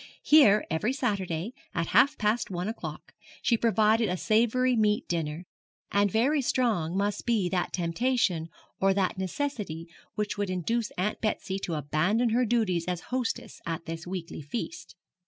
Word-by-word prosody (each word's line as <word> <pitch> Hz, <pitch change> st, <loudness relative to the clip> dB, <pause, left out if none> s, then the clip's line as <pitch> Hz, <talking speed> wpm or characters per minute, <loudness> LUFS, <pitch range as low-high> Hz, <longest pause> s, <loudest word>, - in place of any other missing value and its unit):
Here 220 Hz, -9 st, +6 dB
every 210 Hz, +10 st, 0 dB
Saturday, 200 Hz, -, -2 dB, 0.2 s
at 165 Hz, -, +1 dB
half 255 Hz, +7 st, +5 dB
past 215 Hz, +2 st, 0 dB
one 180 Hz, 0 st, -3 dB
o'clock, 225 Hz, -, -6 dB, 0.3 s
she 235 Hz, -, +3 dB
provided 225 Hz, -1 st, +3 dB
a 180 Hz, -, -1 dB
savoury 240 Hz, +5 st, +2 dB
meat 210 Hz, -2 st, +2 dB
dinner; 165 Hz, 0 st, -2 dB, 0.5 s
and 200 Hz, 0 st, +3 dB
very 265 Hz, +9 st, +2 dB
strong 215 Hz, -10 st, 0 dB
must 205 Hz, +1 st, -1 dB
be 225 Hz, -6 st, +1 dB
that 180 Hz, -1 st, -1 dB
temptation 175 Hz, -1 st, 0 dB, 0.3 s
or 195 Hz, 0 st, +3 dB
that 190 Hz, -1 st, 0 dB
necessity 190 Hz, -, -3 dB, 0.3 s
which 210 Hz, -1 st, -2 dB
would 205 Hz, -2 st, -1 dB
induce 210 Hz, +6 st, -1 dB
Aunt 195 Hz, +4 st, -1 dB
Betsy 195 Hz, -3 st, -1 dB
to 170 Hz, -, -3 dB
abandon 180 Hz, -, +1 dB
her 245 Hz, +3 st, +2 dB
duties 200 Hz, -8 st, +1 dB
as 180 Hz, -1 st, -2 dB
hostess 255 Hz, -3 st, -3 dB
at 165 Hz, 0 st, -3 dB
this 165 Hz, +1 st, -6 dB
weekly 180 Hz, -3 st, -5 dB
feast. 235 Hz, -, -6 dB
205 Hz, 155 wpm, -28 LUFS, 175-235 Hz, 0.5 s, Here